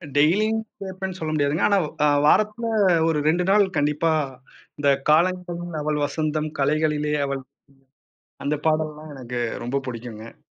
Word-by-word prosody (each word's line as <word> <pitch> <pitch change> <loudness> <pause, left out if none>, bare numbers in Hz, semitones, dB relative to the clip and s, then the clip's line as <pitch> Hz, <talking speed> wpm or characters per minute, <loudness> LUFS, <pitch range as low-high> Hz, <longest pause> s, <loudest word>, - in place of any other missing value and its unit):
டேய்லியும் 210 +10 +3 0.2
கேப்பேன்னு 190 -1 -5
சொல்ல 155 -1 -3
முடியாது. 145 -1 +1
ஆனா 200 - +3 0.3
அ - - +5 0.2
வாரத்துல 215 +7 +2 0.4
ஒரு 160 -2 +1
2 175 +2 +2
நாள் 200 0 +5
கண்டிப்பா 150 +3 +1 0.7
இந்தக் 140 -1 +2
காலங்களில் 175 0 +1
அவள் 150 0 -1
வசந்தம் 155 +1 -2
கலைகளிலே 150 +1 +1
அவள் 140 -1 -3 1.0
அந்தப் 150 +1 -2
பாடல்ளெல்லாம் 155 -1 -1
எனக்கு 125 -2 -5 0.2
ரொம்ப 135 +3 -1
புடிக்கும்ங்க. 115 -2 -8
155 Hz, 125 wpm, -23 LUFS, 145-175 Hz, 1.0 s, அ